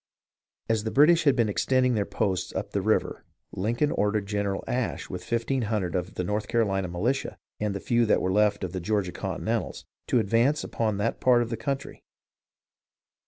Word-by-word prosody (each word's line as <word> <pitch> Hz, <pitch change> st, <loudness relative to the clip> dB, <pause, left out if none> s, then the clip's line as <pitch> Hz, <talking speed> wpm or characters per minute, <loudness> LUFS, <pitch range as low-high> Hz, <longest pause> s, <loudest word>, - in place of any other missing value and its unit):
As 110 Hz, -2 st, +1 dB
the 110 Hz, -, -2 dB
British 155 Hz, +6 st, +5 dB
had 140 Hz, -4 st, +5 dB
been 115 Hz, -3 st, +2 dB
extending 125 Hz, +4 st, +2 dB
their 105 Hz, -3 st, 0 dB
posts 95 Hz, -3 st, -1 dB
up -, -, -3 dB
the -, -, 0 dB
river, -, -, 0 dB, 0.3 s
Lincoln 120 Hz, +10 st, 0 dB
ordered 105 Hz, 0 st, 0 dB
General 100 Hz, -1 st, -2 dB
Ashe 125 Hz, -2 st, -2 dB
with 90 Hz, -, -5 dB
fifteen 120 Hz, +3 st, -1 dB
hundred 100 Hz, -6 st, -1 dB
of 90 Hz, -1 st, -3 dB
the 90 Hz, -, -2 dB
North 105 Hz, +3 st, -2 dB
Carolina 95 Hz, -5 st, +1 dB
militia, 110 Hz, +11 st, -2 dB, 0.2 s
and 105 Hz, -2 st, -1 dB
the -, -, -2 dB
few 120 Hz, +2 st, +1 dB
that -, -, +4 dB
were 95 Hz, -, -1 dB
left 105 Hz, -1 st, +2 dB
of 90 Hz, -, -3 dB
the 95 Hz, -, -3 dB
Georgia 100 Hz, 0 st, 0 dB
Continentals, -, -, -3 dB, 0.2 s
to -, -, +2 dB
advance 115 Hz, +7 st, +2 dB
upon 110 Hz, -3 st, -1 dB
that 105 Hz, +3 st, -1 dB
part 120 Hz, -2 st, +5 dB
of 115 Hz, -, -7 dB
the -, -, 0 dB
country. 135 Hz, +4 st, -4 dB
110 Hz, 185 wpm, -27 LUFS, 100-120 Hz, 0.3 s, British